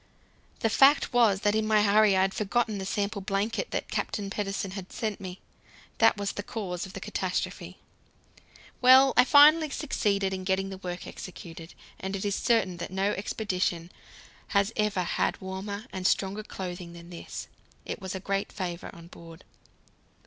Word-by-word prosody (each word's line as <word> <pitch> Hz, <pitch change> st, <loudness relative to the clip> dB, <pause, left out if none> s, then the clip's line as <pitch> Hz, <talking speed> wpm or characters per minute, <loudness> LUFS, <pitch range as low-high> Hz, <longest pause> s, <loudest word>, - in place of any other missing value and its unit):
The 225 Hz, -, +2 dB
fact 275 Hz, +3 st, +5 dB
was 220 Hz, -5 st, +4 dB
that 205 Hz, 0 st, +2 dB
in 215 Hz, 0 st, +1 dB
my 215 Hz, -1 st, +4 dB
hurry 205 Hz, -1 st, +5 dB
I -, -, +4 dB
had 190 Hz, 0 st, +1 dB
forgotten 215 Hz, 0 st, 0 dB
the 190 Hz, -, -4 dB
sample 200 Hz, +1 st, -2 dB
blanket 200 Hz, -, -1 dB
that -, -, -4 dB
Captain 200 Hz, -2 st, -2 dB
Pedersen 195 Hz, -2 st, -3 dB
had 190 Hz, -1 st, -8 dB
sent 215 Hz, -2 st, -3 dB
me. 185 Hz, -1 st, -7 dB, 0.6 s
That 225 Hz, -1 st, +5 dB
was 200 Hz, -1 st, -2 dB
the -, -, -5 dB
cause 190 Hz, -4 st, -5 dB
of 190 Hz, -, -13 dB
the -, -, -6 dB
catastrophe. -, -, -3 dB, 1.0 s
Well, 260 Hz, +1 st, +7 dB
I 250 Hz, -, +7 dB
finally 305 Hz, +3 st, +7 dB
succeeded 200 Hz, -10 st, 0 dB
in 185 Hz, 0 st, -4 dB
getting 190 Hz, +1 st, 0 dB
the 190 Hz, -, -7 dB
work 180 Hz, -1 st, -6 dB
executed, 165 Hz, -2 st, -9 dB, 0.2 s
and 190 Hz, +1 st, -4 dB
it 195 Hz, -, -4 dB
is 200 Hz, -, 0 dB
certain 195 Hz, -6 st, +1 dB
that 170 Hz, -, -5 dB
no 195 Hz, +2 st, 0 dB
expedition 185 Hz, -4 st, -2 dB, 0.7 s
has 200 Hz, +3 st, +2 dB
ever 210 Hz, -4 st, +1 dB
had -, -, -1 dB
warmer 195 Hz, +3 st, -6 dB
and 185 Hz, -1 st, 0 dB
stronger 195 Hz, +2 st, 0 dB
clothing 180 Hz, -4 st, -7 dB
than 170 Hz, 0 st, -12 dB
this. 170 Hz, -, -7 dB, 0.4 s
It -, -, -5 dB
was 190 Hz, 0 st, -5 dB
in 190 Hz, -, -6 dB
great 195 Hz, 0 st, -1 dB
favour 180 Hz, -3 st, -5 dB
on 170 Hz, -1 st, -12 dB
board. 170 Hz, 0 st, -13 dB
195 Hz, 170 wpm, -28 LUFS, 185-215 Hz, 1.0 s, Well